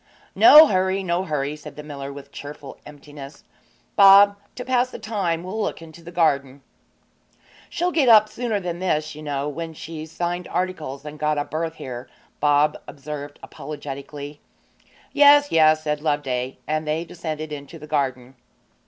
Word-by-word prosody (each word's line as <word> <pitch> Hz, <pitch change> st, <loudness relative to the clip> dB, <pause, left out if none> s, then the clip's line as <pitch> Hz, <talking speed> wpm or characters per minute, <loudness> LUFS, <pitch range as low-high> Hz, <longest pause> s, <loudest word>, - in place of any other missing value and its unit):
'No 315 Hz, -3 st, +9 dB
hurry, 190 Hz, -4 st, 0 dB
no 180 Hz, +1 st, -1 dB
hurry,' 150 Hz, -3 st, -2 dB
said 150 Hz, -1 st, -11 dB
the 150 Hz, -, -9 dB
miller, 140 Hz, -2 st, -7 dB
with 140 Hz, 0 st, -11 dB
cheerful 145 Hz, -1 st, -10 dB
emptiness. 145 Hz, -1 st, -12 dB, 0.5 s
'Bob, 200 Hz, +1 st, +7 dB, 0.2 s
to 250 Hz, -, -7 dB
pass 255 Hz, -1 st, +1 dB
the -, -, -8 dB
time 195 Hz, -7 st, -2 dB
we'll 200 Hz, +5 st, -4 dB
look -, -, -3 dB
into 165 Hz, +1 st, -13 dB
the 170 Hz, +1 st, -11 dB
garden.' 140 Hz, -5 st, 0 dB, 1.1 s
'She'll 355 Hz, +1 st, -1 dB
get 290 Hz, -7 st, +2 dB
up 215 Hz, -2 st, +7 dB
sooner 220 Hz, -1 st, -3 dB
than 175 Hz, -2 st, -5 dB
this, 155 Hz, -4 st, -1 dB
you 155 Hz, -, -10 dB
know, 145 Hz, -1 st, -3 dB
when 160 Hz, +2 st, -6 dB
she's 160 Hz, 0 st, -8 dB
signed 175 Hz, +1 st, -3 dB
articles 160 Hz, -6 st, -4 dB
and 150 Hz, 0 st, -9 dB
got 150 Hz, 0 st, 0 dB
a 145 Hz, -, -1 dB
berth 160 Hz, +1 st, -4 dB
here,' 125 Hz, -1 st, -8 dB, 0.3 s
Bob 150 Hz, +1 st, +2 dB
observed 145 Hz, 0 st, -8 dB
apologetically. 145 Hz, 0 st, -8 dB, 0.7 s
'Yes, 290 Hz, 0 st, +6 dB
yes,' 155 Hz, -1 st, +4 dB
said 150 Hz, -1 st, -2 dB
Loveday; 135 Hz, -4 st, -2 dB
and 155 Hz, +1 st, -2 dB
they 160 Hz, +2 st, -1 dB
descended 155 Hz, -3 st, -6 dB
into 145 Hz, +2 st, -8 dB
the 150 Hz, -, -11 dB
garden. 135 Hz, -4 st, -2 dB
155 Hz, 160 wpm, -22 LUFS, 145-180 Hz, 1.1 s, No